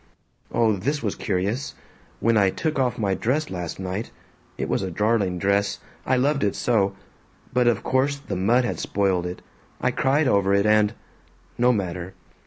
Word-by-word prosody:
"Oh. 115 -2 +3
This 140 +8 -2
was 105 - 0
curious: 105 +7 -2 0.5
When 115 0 +3
I 100 -3 +4
took 155 - -2
off 125 -2 +1
my 100 -3 0
dress 145 +10 -1
last 90 -2 -5
night 95 +4 -4 0.5
it - - -2
was - - 0
a 95 - -2
darling 105 -1 +1
dress, 100 +2 +1 0.3
I 130 - +3
loved 140 +2 +1
it 100 - +1
so, 100 -5 +1 0.6
but 125 -1 +3
of 120 -4 +2
course 135 +2 +1
the 140 -8 -6
mud 115 +7 +3
had - - -3
spoiled 95 -3 0
it. 90 - -7 0.4
I - - +1
cried 140 +2 +2
over 100 -4 +3
it 100 +1 +2
and 105 0 +3 0.6
No 125 +1 +4
matter. 95 -4 -3
105 Hz, 175 wpm, -24 LUFS, 95-125 Hz, 0.6 s, I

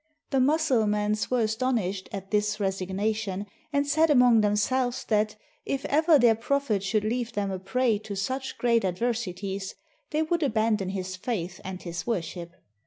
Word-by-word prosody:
The 270 - +2
Mussulmans 220 -8 +2
were 250 -2 +2
astonished 220 -4 -1
at 195 -1 -7
this 210 0 +1
resig 190 -2 -2
nation, 205 0 -2 0.3
and 285 -1 +1
said 315 +3 +3
among 250 -5 +6
themselves 240 +5 +1
that 215 -1 +2 0.3
if 275 0 -3
ever 310 +2 +4
their 240 -4 +5
prophet 230 -2 0
should 205 +2 0
leave 235 +2 -2
them 200 -2 -1
a 190 - -3
prey 215 +3 +1
to 215 -1 -7
such 260 +7 -3
great 235 -1 +3
adversi 200 0 -2
ties, 195 -1 -4 0.3
they 310 0 +1
would 340 +2 0
abandon 220 -7 +1
his 185 -1 -4
faith 185 -3 -4
and 190 -1 -6
his 170 +2 -5
worship. 175 -4 -3
215 Hz, 165 wpm, -27 LUFS, 195-250 Hz, 0.3 s, among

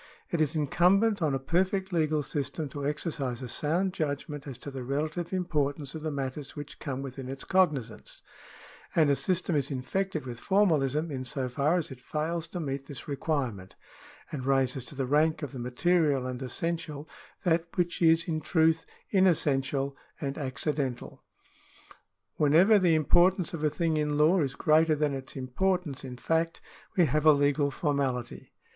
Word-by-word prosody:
It 170 - +1
is 155 +1 +1
incumbent 185 +8 +3
on 150 -4 +2
a 135 0 -5
perfect 190 +3 +1
legal 155 -2 +1
system 145 +2 -3
to 145 0 -6
exercise 140 -4 -2
a - - -4
sound 170 +9 0
judgment 145 -3 -3
as 135 -4 -6
to 140 +3 -8
the 130 -2 -6
relative 155 +6 -2
importance 150 -6 -1
of 160 - -6
the 155 - -2
matters 140 0 -5
which 145 0 -8
come 135 -1 -4
within 130 -1 -7
its 135 0 -6
cognisance; 150 - 0 0.7
and 155 -3 +5
a - - +4
system 180 +1 0
is 140 -2 +1
infected 155 +4 -2
with 120 -2 -6
formalism 160 -6 +2
in 130 -2 -3
so 130 0 -3
far 140 +7 +1
as 165 -5 -3
it 130 -1 -10
fails 160 +4 -2
to 180 - -6
meet 135 -3 -4
this 135 -4 -9
requirement, 135 - -2 0.6
and 130 -3 -4
raises 135 -2 +1
to 145 - -9
the 135 -1 -1
rank 155 +3 +2
of 145 - -4
the 130 - -7
material 140 +2 +1
and 130 0 -4
essential 155 +2 -3 0.4
that 170 -2 +2
which 175 0 0
is 165 0 +4
in 155 -2 -1
truth 160 0 +2 0.3
unessential 140 -7 +2 0.2
and 140 -2 -3
accidental. 135 -2 -2 1.2
Whenever 170 +9 +5
the 175 -4 +4
importance 175 +3 +3
of 160 -2 -4
a 150 - +4
thing 160 +1 0
in 150 -1 0
law 165 +5 +4
is 135 -3 -1
greater 155 +2 +4
than 150 -1 0
its 135 -1 -6
importance 145 +3 -1
in 125 -2 -7
fact, 165 +5 0 0.4
we 175 - +6
have 155 0 +1
a - - +10
legal 145 0 +2
formality. 135 -5 -2
150 Hz, 170 wpm, -29 LUFS, 135-165 Hz, 1.2 s, a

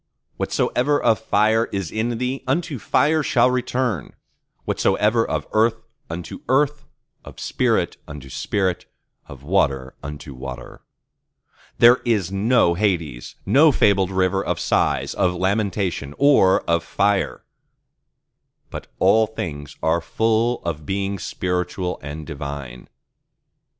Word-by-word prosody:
Whatsoever 145 +4 0
of 110 - +2
fire 110 +1 +2
is 95 -7 -4
in 115 +2 -1
thee, 125 +2 -3
unto 140 -1 -1
fire 150 +10 +2
shall 125 -3 +3
return; 125 - -2 0.5
whatsoever 110 +2 +2
of - - -3
earth, 110 +1 +3 0.3
unto 85 +1 -6
earth; 145 +2 +1 0.4
of - - -12
spirit, - - 0
unto 70 -2 -9
spirit; 95 +7 -2 0.4
of 70 -1 -12
water, 70 -6 0
unto 70 0 -8
water. 65 -1 -9 1.0
There 120 +2 +7
is 105 -7 0
no 100 -2 +3
Hades, 85 - -2
no 150 +3 +5
fabled 100 -6 +3
rivers 95 0 0
of - - -1
Sighs, - - 0
of 90 -1 +1
Lamentation, 95 -6 -1
or 140 -10 +5
of 85 0 0
Fire: 100 +3 0 1.3
but - - -7
all 110 +4 +4
things 75 -9 -6
are 80 +1 +2
full 115 +6 0
of 80 -3 -4
Beings 100 +3 -3
spiritual 90 0 -2
and 75 +1 -7
divine. 70 -5 -7
95 Hz, 120 wpm, -22 LUFS, 80-115 Hz, 1.3 s, There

